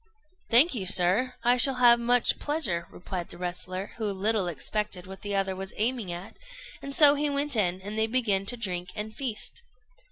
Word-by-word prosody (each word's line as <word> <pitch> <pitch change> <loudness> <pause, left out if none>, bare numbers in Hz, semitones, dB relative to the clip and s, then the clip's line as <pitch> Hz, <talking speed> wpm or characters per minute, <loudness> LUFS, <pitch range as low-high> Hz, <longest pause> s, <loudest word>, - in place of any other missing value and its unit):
] 370 +4 -41
"Thank 275 +8 +6
you, 200 -7 -4
sir, 200 +7 +3
I 245 +1 +3
shall 265 +2 +5
have 240 -1 +5
much 245 +1 +2
pleasure," 235 - -2
replied 180 -1 -7
the - - -11
wrestler, 180 +2 -5
who 225 - -3
little 200 0 0
expected 185 +2 -4
what 190 +1 -11
the 205 -1 -4
other 195 -1 -1
was 190 0 -7
aiming 225 -3 0
at; 175 +2 -9 0.4
and 275 0 -6
so 290 -2 +8
he 295 0 -1
went 285 -1 +1
in, 185 -4 0
and 210 +3 -5
they 220 - +2
began 215 -5 0
to 245 - -3
drink 180 -5 -4
and 215 +1 -6
feast. 255 - -4
215 Hz, 195 wpm, -27 LUFS, 190-250 Hz, 0.4 s, so